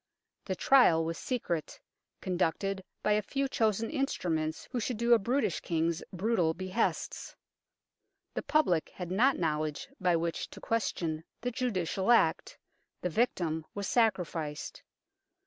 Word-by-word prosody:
The 190 - -2
trial 180 -10 +5
was 165 +1 -3
secret, 175 - -3 0.4
conducted 190 +2 -1 0.2
by 210 - +2
a 210 0 +3
few 275 +6 -1
chosen 225 -3 0
instruments 165 - -1
who 250 - -1
should 235 +1 -2
do 235 +1 +4
a 235 - +6
brutish 240 - 0
King's 165 0 0
brutal 185 -4 +1
behests; 185 +5 -2 1.0
the - - -2
public 180 - +2
had 180 -1 -5
not 250 +9 +4
know 155 -3 0
ledge 155 -1 -4
by 180 -2 +3
which 165 0 -2
to - - -11
question 170 -8 -1 0.2
the 245 +1 -1
judicial 195 -5 -1
act; 235 - +3 0.4
the 180 - -1
victim 165 -7 0
was 200 -1 -3
sacrificed. 175 -10 0
185 Hz, 135 wpm, -31 LUFS, 165-230 Hz, 1.0 s, a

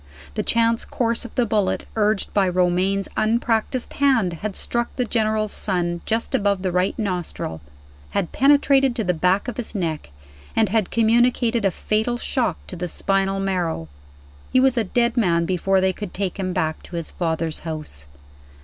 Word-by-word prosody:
The - - -1
chance 230 0 +2
course 235 -1 -1
of 240 - -10
the 245 - +2
bullet, 205 -3 0
urged 210 -2 +1
by 195 -2 +3
Romayne's 185 +2 +1
unpracticed 230 +2 0
hand, 255 -11 +2
had 210 -2 -3
struck 235 0 -1
the 250 - 0
General's 215 -2 0
son 175 -3 -1
just 225 +1 -1
above 200 -2 +1
the 185 - 0
right 180 +2 0
nostril 180 - -3 0.5
had 195 -4 -2
penetrated 275 -2 +4
to 225 - -1
the 180 -2 +1
back 180 +6 +1
of 245 - -4
his 235 -2 -4
neck 160 - -2 0.5
and 220 -3 +3
had 215 -2 +1
communicated 230 0 +2
a - - +5
fatal 220 +6 -1
shock 255 +1 -1
to - - -5
the 180 +1 -3
spinal 195 +2 0
marrow. 175 - -2 0.6
He 255 - +4
was 260 -1 +4
a 230 - +2
dead 235 +4 +1
man 170 -7 +2
before 190 +2 +1
they 190 0 +2
could 205 -1 -7
take 195 0 -3
him 185 -1 -1
back 160 -3 -1
to 175 - -10
his 170 -2 -3
father's 160 -2 -2
house. 155 - -5
200 Hz, 175 wpm, -22 LUFS, 180-230 Hz, 0.6 s, a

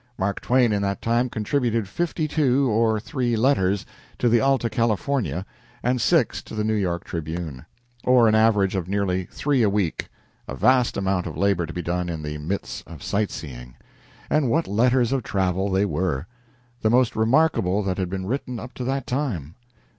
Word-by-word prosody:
Mark 95 +1 -1
Twain 125 -3 +3
in 100 - 0
that 100 0 -1
time 120 +2 +1
contributed 115 -1 -1
fifty 160 - -2
two 140 -3 +2
or 110 0 +2
three 125 0 -1
letters 100 -6 +2 0.3
to 120 - +2
the 120 0 +4
"Alta 135 -3 +2
California" 110 - -1 0.4
and 125 0 +1
six 160 -2 +2
to - - -10
the 105 - -1
"New 110 0 +1
York 90 -5 -1
Tribune," 80 -4 -5 0.4
or 125 -2 +5
an 110 - +3
average 110 -3 +3
of 95 -3 -2
nearly 95 -2 0
three 140 -3 0
a 110 - +4
week 100 -5 -1 0.4
a 65 - -5
vast 125 - +3
amount 95 -2 0
of - - -6
labor 95 -4 +1
to - - -6
be 90 - -4
done 90 +1 -2
in 80 -2 -4
the 75 0 -5
midst 90 +7 -4
of - - -10
sight 105 0 0
seeing. 60 -5 -8 0.5
And 150 -5 +2
what 165 +6 +1
letters 120 +3 +2
of 135 -1 +1
travel 95 -2 0
they 95 +1 +2
were! 90 -7 -1 0.6
The 110 - +2
most 125 0 +3
remarkable 110 - +2
that 95 -1 -2
had 90 -2 -1
been 95 0 -4
written 125 +1 -3
up 125 +3 -9
to 125 - -6
that 135 0 -1
time. 115 - -3
105 Hz, 185 wpm, -24 LUFS, 95-125 Hz, 0.6 s, or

